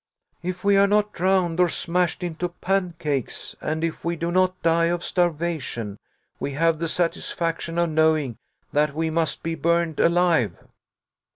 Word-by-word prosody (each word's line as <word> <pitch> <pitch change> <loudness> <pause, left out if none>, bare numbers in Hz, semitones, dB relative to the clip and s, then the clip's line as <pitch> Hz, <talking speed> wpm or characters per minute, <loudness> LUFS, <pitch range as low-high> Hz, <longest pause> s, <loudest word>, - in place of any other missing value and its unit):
"If 180 +1 -4
we 200 0 +4
are 200 0 +6
not 210 +1 +2
drowned, 180 -2 +1
or 180 -1 +5
smashed 175 +1 0
into 175 +1 -3
pancakes, 170 - -2
and 160 +1 -2
if 165 -1 -3
we 170 0 -1
do 170 +1 -2
not 185 0 +2
die 165 0 +3
of 170 0 -1
starvation, 155 - -1 0.4
we 140 - -3
have 165 +2 +2
the 165 - -1
satisfaction 165 0 -1
of 170 -1 +2
knowing 155 -6 +2 0.3
that 150 -1 +2
we 160 0 0
must 160 0 -1
be 165 - -2
burned 170 0 0
alive." 170 - +3
170 Hz, 155 wpm, -24 LUFS, 160-180 Hz, 0.4 s, are